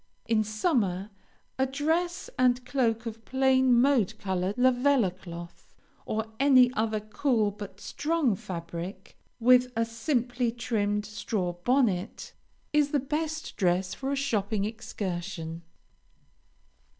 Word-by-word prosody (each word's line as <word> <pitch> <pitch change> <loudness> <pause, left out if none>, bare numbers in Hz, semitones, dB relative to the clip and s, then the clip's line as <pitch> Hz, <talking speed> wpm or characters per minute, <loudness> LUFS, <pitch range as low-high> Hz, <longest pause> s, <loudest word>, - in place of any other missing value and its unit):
In 225 -1 +2
summer, 215 - 0 0.5
a 265 - +3
dress 325 +6 -1
and 250 0 +2
cloak 240 -3 0
of 225 0 -6
plain 260 -1 +3
mode 240 -6 +3
colored 190 -1 -2
Lavella 250 -4 +3
cloth, 170 -2 -11 0.3
or 220 0 -1
any 255 -3 +6
other 215 -1 0
cool 215 0 0
but 200 -1 -9
strong 295 -3 0
fabric, 180 +2 -7 0.2
with 250 +1 +5
a 230 0 +2
simply 245 0 -1
trimmed 210 -3 -1
straw 210 -3 -2
bonnet, 200 -1 0 0.4
is 295 -1 +3
the 290 - +1
best 310 +3 -3
dress 185 0 +1
for 270 +6 -4
a - - +1
shopping 215 -7 0
excursion. 180 -6 -5
225 Hz, 115 wpm, -28 LUFS, 195-260 Hz, 0.5 s, any